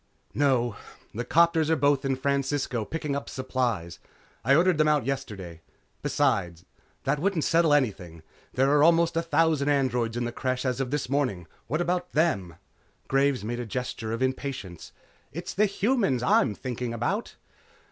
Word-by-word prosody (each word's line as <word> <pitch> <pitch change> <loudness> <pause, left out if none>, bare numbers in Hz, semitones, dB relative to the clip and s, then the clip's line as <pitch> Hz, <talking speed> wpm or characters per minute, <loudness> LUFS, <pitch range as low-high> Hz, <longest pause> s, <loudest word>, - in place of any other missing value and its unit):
"No. 130 -5 +1 0.4
The 120 - -3
'copters 165 +3 +3
are 160 - +4
both 145 -1 +2
in 135 -1 0
Francisco 135 -3 -1
picking 150 -1 -3
up 140 - -4
supplies. 120 -10 -2 0.4
I 135 +4 +4
ordered 175 0 +3
them 155 - +4
out 150 -5 +2
yesterday. 100 -11 -5 0.4
Besides, 85 -3 0 0.4
that 150 - 0
wouldn't 180 -2 0
settle 165 -1 +3
anything. 95 - 0 0.3
There 135 +2 +2
are 145 0 +4
almost 170 +1 +4
a 165 - +2
thousand 160 -3 +2
androids 125 -5 +1
in 120 - -1
the 120 - -3
Creche 130 +2 -2
as 130 0 0
of 130 - -2
this 145 0 -2
morning. 125 - -1 0.2
What 155 +7 -1
about 180 +1 -1
them?" 105 - +1 0.5
Graves 135 -3 +2
made 120 +3 -3
a 120 - -3
gesture 115 -1 -4
of 115 +3 -1
impatience. 130 -9 -4 0.4
"It's 170 +3 -6
the 210 +2 +3
humans 200 - +1
I'm 110 -3 +3
thinking 125 -1 -4
about." 195 - -2
135 Hz, 160 wpm, -27 LUFS, 120-155 Hz, 0.5 s, are